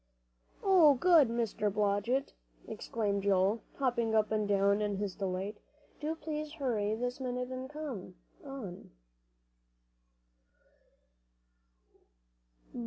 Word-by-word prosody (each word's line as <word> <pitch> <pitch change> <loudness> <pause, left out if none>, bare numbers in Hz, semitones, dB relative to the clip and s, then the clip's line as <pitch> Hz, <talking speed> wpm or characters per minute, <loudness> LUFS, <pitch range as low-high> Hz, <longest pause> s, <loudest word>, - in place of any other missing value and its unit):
"Oh, 350 -7 +6
good! 320 0 +6
Mr. 225 -3 -1
Blodgett," 210 +6 0 0.3
exclaimed 205 -3 -2
Joel, 195 +2 +2
hopping 235 -4 0
up 215 0 +2
and 215 -1 +1
down 200 +1 +3
in 205 -1 0
his 200 -2 -2
delight. 195 +2 -3 0.4
"Do 310 +2 -2
please 305 -1 -5
hurry 225 -8 -1
this 245 +3 -3
minute 250 -1 -3
and 260 0 -5
come 275 -12 -6 0.3
on." 265 -11 -8
230 Hz, 100 wpm, -32 LUFS, 205-270 Hz, 0.4 s, Oh